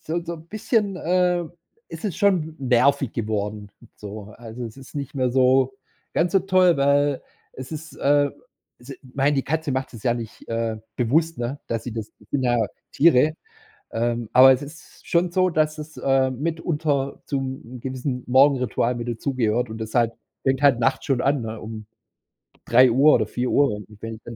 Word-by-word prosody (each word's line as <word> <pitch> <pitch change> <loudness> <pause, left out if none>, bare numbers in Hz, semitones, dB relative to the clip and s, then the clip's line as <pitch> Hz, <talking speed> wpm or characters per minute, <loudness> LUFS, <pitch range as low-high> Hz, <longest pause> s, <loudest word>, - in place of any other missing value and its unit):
so 170 +2 -3
so 170 0 -4
'n 160 0 -13
bisschen, 215 -3 0
ähm, 180 -1 +1 0.4
ist - - -9
es 195 - -2
schon 170 -6 +1
nervig 135 0 +2
geworden, 105 -2 -3 0.3
so. 105 0 -9
Also, 120 +1 -8
es 115 +2 -8
ist 135 - -14
nicht 140 +1 -5
mehr 130 -2 +1
so 130 +1 +3 0.4
ganz 175 +3 +1
so 195 - +5
toll, 185 -3 +4
weil, 140 0 +2 0.3
es 130 +2 -9
ist, 155 0 -7
äh, 145 0 +3 0.5
s 125 +3 -14
ich - - -9
mein, 140 +1 +2
die 135 - 0
Katze 160 0 -1
macht 130 0 -3
es 110 - -10
ja 120 -2 +2
nicht, 115 -2 -8
äh, 115 -1 -2 0.2
bewusst, 155 +7 +1
ne, 125 +4 -4
dass 115 -1 -3
sie 120 - -5
das 110 -1 -6
das 105 - -22
sind 140 -2 0
ja 120 -1 +2 0.4
Tiere. 155 -1 +4 0.6
Ähm, 120 -1 -1
aber 130 +1 +9
es 130 - -2
ist 150 +4 -13
schon 170 0 +2
so, 185 0 +2
dass 155 -1 0
es, 155 +1 -9
äh, 135 -1 +2
mitunter 150 -1 -2
zum 130 -3 -4
gewissen 130 -1 -4
Morgenritual 130 -2 +3
mit 120 0 -5
dazugehört. 120 -1 -1
Und 110 - -7
das 110 0 -6
halt 115 -2 +3 0.3
fängt 135 0 +1
halt 140 -4 +5
nachts 135 +2 +1
schon 130 -3 +1
an, 140 -1 +1
ne, 110 -1 -5
um 110 -1 -8 0.8
03:00 130 +4 +6
oder 110 - +2
04:00, 125 -1 +1 0.2
wenn 115 0 -7
135 Hz, 175 wpm, -23 LUFS, 120-155 Hz, 0.8 s, aber